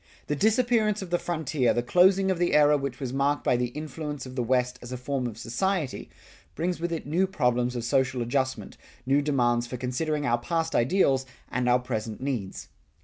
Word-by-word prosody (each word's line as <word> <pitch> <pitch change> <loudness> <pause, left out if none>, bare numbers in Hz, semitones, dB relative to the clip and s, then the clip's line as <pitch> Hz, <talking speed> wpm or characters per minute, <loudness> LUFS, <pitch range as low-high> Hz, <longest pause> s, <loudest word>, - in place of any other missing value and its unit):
The 150 - -1
disappearance 220 - +2
of 180 - -10
the 175 - +2
frontier, 155 -7 0
the 120 - 0
closing 190 +7 +4
of 180 - -2
the 175 -3 +2
era 150 0 +6
which 135 -3 -3
was 130 -3 -4
marked 140 +2 +1
by - - +3
the 125 0 0
influence 150 +1 -6
of 130 0 -9
the 125 - 0
West 125 +1 0
as 120 - -9
a 125 - -3
form 130 0 -2
of 110 -3 -7
society, 150 +7 -2 0.5
brings 175 +1 -1
with 170 +1 -2
it 165 - -3
new 175 +6 +1
problems 125 -7 0
of 120 - -3
social 130 +1 +1
adjustment, 130 +2 -2 0.3
new 140 +2 +3
demands 120 -4 +1
for 125 - -5
considering 145 +5 -2
our 120 -2 +2
past 165 +5 -2
ideals 135 -1 +2 0.2
and 125 0 0
our 125 - +5
present 110 -3 -4
needs. 125 -8 -4
135 Hz, 200 wpm, -27 LUFS, 125-165 Hz, 0.5 s, era